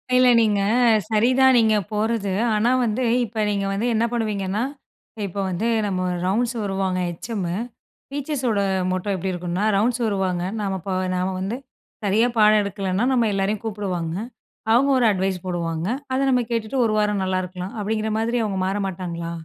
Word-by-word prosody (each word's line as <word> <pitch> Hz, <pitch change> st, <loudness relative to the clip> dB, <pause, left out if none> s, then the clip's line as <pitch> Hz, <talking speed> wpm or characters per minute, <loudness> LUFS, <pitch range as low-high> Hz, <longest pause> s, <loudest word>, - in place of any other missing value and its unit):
இல்ல. 255 Hz, 0 st, +6 dB
நீங்க 210 Hz, -3 st, +2 dB, 0.5 s
சரிதான் 255 Hz, +4 st, +4 dB
நீங்க 220 Hz, -1 st, +4 dB, 0.2 s
போறது. 210 Hz, -2 st, 0 dB, 0.2 s
ஆனா 230 Hz, +4 st, +2 dB
வந்து, 235 Hz, +3 st, -1 dB, 0.2 s
இப்ப 220 Hz, -1 st, -2 dB
நீங்க 200 Hz, -1 st, -1 dB
வந்து 220 Hz, +5 st, -1 dB
என்ன 230 Hz, +2 st, +2 dB
பண்ணுவீங்கன்னா, 210 Hz, -2 st, -1 dB, 0.6 s
இப்போ 200 Hz, +2 st, -6 dB
வந்து 185 Hz, +6 st, -1 dB, 0.2 s
நம்ம 185 Hz, -2 st, -1 dB, 0.2 s
ரவுண்ட்ஸ் 235 Hz, +6 st, 0 dB
வருவாங்க 195 Hz, -2 st, -1 dB
ஹெச்எம்மு. 180 Hz, -1 st, -4 dB, 0.6 s
டீச்சர்ஸோட 270 Hz, -6 st, -1 dB, 0.3 s
மொட்டோ 185 Hz, +2 st, -2 dB
எப்டி 185 Hz, +1 st, -2 dB
இருக்குன்னா 180 Hz, +3 st, -2 dB
ரவுண்ட்ஸ் 240 Hz, +4 st, +1 dB
வருவாங்க, 190 Hz, -4 st, 0 dB, 0.2 s
நம்ம 195 Hz, -1 st, -1 dB
ப -, -, -1 dB, 0.2 s
நாம 185 Hz, +1 st, -1 dB
வந்து 195 Hz, +6 st, -3 dB, 0.5 s
சரியா 210 Hz, +4 st, +3 dB
பாடம் 215 Hz, 0 st, +6 dB
எடுக்கலன்னா 195 Hz, 0 st, -2 dB
நம்ம 240 Hz, -3 st, +3 dB
எல்லாரையும் 195 Hz, +2 st, -1 dB
கூப்டுவாங்க. 185 Hz, -6 st, -3 dB, 0.6 s
அவங்க 265 Hz, +5 st, +4 dB
ஒரு 245 Hz, -, +3 dB
அட்வைஸ் 190 Hz, -1 st, 0 dB
போடுவாங்க. 170 Hz, -1 st, -2 dB, 0.3 s
அத 260 Hz, -, +1 dB
நம்ம 250 Hz, -1 st, +3 dB
கேட்டுட்டு 230 Hz, +3 st, -2 dB
ஒரு 215 Hz, -, +1 dB
வாரம் 210 Hz, -2 st, +1 dB
நல்லா 185 Hz, 0 st, 0 dB
இருக்கலாம். 180 Hz, +1 st, -6 dB
அப்டிங்கிற 215 Hz, +1 st, -1 dB
மாதிரி 235 Hz, +2 st, 0 dB
அவுங்க 195 Hz, -3 st, -2 dB
மாற 195 Hz, +2 st, -1 dB
மாட்டாங்களா? 170 Hz, -2 st, -5 dB
205 Hz, 155 wpm, -23 LUFS, 185-225 Hz, 0.6 s, இல்ல